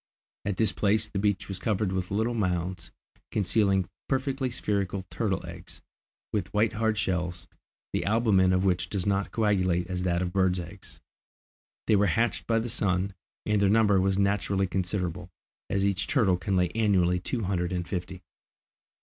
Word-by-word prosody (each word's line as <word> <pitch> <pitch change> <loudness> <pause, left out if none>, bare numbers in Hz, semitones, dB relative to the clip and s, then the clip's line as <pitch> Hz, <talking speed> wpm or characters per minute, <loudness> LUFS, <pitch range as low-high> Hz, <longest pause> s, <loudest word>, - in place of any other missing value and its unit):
At 100 -2 -1
this 110 0 +3
place 110 +1 +2
the 100 - -3
beach 100 -1 0
was 95 -2 -5
covered 105 -1 0
with 95 -1 -2
little 110 +4 0
mounds, 90 -4 -2 0.4
concealing 100 -2 +2 0.2
perfectly 135 -1 0
spherical 100 -4 -2
turtles' 95 -5 -1
eggs, 85 +1 -10 0.5
with 100 -3 -1
white 105 +1 +3
hard 110 0 0
shells, 90 -3 -2 0.5
the - - 0
albumen 105 -4 +3
of 95 +1 +2
which 90 -2 +1
does 95 -4 -2
not 100 -1 0
coagulate 95 -5 +1
as 90 0 -3
that 90 -1 0
of 90 0 -3
birds' 95 -2 +2
eggs. 90 +3 -10 0.9
They 110 - +4
were 100 0 +3
hatched 115 +8 0
by 115 - +2
the 115 +1 -1
sun, 100 -4 0 0.3
and 105 -1 +2
their 100 - +4
number 105 -3 +4
was 95 0 +1
naturally 100 -1 +1
considerable, 90 -1 -2 0.4
as 100 0 +1
each 100 0 0
turtle 110 -10 +3
can 90 +2 -1
lay 90 -1 +2
annually 95 -4 +2
two 115 +5 -3
hundred 90 -2 -1
and 90 -2 -2
fifty. 90 0 -5
95 Hz, 165 wpm, -28 LUFS, 90-105 Hz, 0.9 s, They